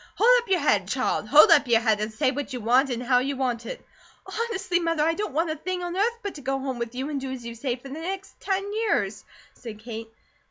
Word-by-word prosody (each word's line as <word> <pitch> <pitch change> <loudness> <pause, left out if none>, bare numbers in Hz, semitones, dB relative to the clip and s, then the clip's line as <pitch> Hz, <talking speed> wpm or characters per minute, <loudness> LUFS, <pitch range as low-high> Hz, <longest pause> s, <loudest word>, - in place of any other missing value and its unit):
Hold 455 - +4
up 470 - -16
your 375 -2 +3
head, 205 -10 +2
child! 250 -2 -1
Hold 300 +6 +8
up 290 -4 +6
your 235 -2 +5
head, 220 -3 +2
and 215 +1 -2
say 260 +4 +1
what 280 0 -5
you 250 - -3
want, 250 +5 +3
an' 245 -1 -2
how 250 0 +3
you 275 +2 -2
want 245 -3 -2
it!" - - -7 0.4
"Honestly, 385 -6 -1
Mother, 330 -3 0
I 325 +1 +2
don't 410 +1 -3
want 325 +1 +1
a - - -2
thing 360 +3 -4
on 350 0 -4
earth 455 +5 +1
but 405 - -4
to 290 - -10
go 270 +1 -1
home 265 -2 -4
with 235 0 -4
you 265 +4 -3
and 280 -2 -3
do 265 -1 -4
as 250 -3 -7
you 235 - -5
say 240 +1 -2
for 260 +2 -12
the 290 +4 -6
next 380 +4 -6
ten 395 +1 -2
years," 440 0 0 0.3
said 225 -4 -9
Kate. 225 0 -8
275 Hz, 265 wpm, -25 LUFS, 240-355 Hz, 0.4 s, Hold